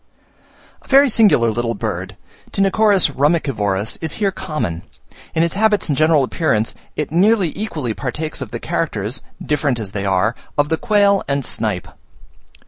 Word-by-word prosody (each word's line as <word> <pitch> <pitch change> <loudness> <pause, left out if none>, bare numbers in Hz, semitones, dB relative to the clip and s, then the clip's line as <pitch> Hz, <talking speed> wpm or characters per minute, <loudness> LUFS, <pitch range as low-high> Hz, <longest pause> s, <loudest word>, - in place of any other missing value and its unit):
A - - -21
very 275 +1 +6
singular 205 - +4
little 115 +1 -2
bird, 95 -2 -4 0.3
Tinochorus 195 -2 +3
rumicivorus, 125 - 0
is 160 -2 -2
here 200 -3 0
common: 115 - -4 0.5
in 160 - +3
its 170 - 0
habits 210 -3 +2
and 145 - +2
general 155 -1 +4
appearance, 120 -5 0 0.2
it 150 - -3
nearly 190 0 +3
equally 155 - -3
partakes 150 +8 -4
of - - -5
the - - -5
characters, 125 - -2 0.2
different 145 -4 0
as 105 -4 -5
they 100 -1 -3
are, 95 +4 +2 0.2
of 145 0 +2
the 160 - +1
quail 200 +1 +3
and 140 -2 -1
snipe. 105 -6 -2
150 Hz, 150 wpm, -19 LUFS, -, 0.5 s, very